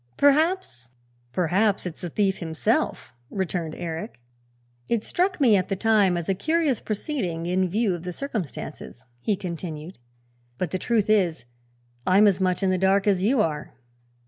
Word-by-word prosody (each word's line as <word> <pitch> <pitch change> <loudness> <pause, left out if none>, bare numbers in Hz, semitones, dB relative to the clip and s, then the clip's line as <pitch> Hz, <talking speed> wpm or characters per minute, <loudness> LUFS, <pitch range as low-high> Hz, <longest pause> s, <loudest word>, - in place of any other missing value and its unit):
Perhaps 285 - +2 0.2
" 120 - -38
"Perhaps 185 - +1
it's 175 -3 -6
the 175 - -4
thief 195 +2 0
himself," 170 - -1 0.2
returned 175 -4 -3
Eric. 170 - -5 0.7
"It 230 -2 +1
struck 365 0 0
me 240 -7 +5
at 185 -2 0
the 195 - 0
time 200 -3 +3
as 170 - -4
a 195 - +2
curious 310 - +1
proceeding, 200 - -3
in 185 +1 +1
view 210 +1 +1
of 175 - -5
the 180 +1 -5
circumstances," 175 - -6
he 205 - 0
continued; 170 -3 -6 0.6
"but 180 - -2
the 185 - -1
truth 225 -2 +1
is, 180 - +2 0.6
I'm 195 +3 +6
as 195 -2 +3
much 185 +1 +1
in 190 - +3
the 185 - +1
dark 195 +1 +3
as 195 -3 +2
you 235 +3 +3
are." 150 -5 -2
190 Hz, 165 wpm, -25 LUFS, 170-215 Hz, 0.7 s, I'm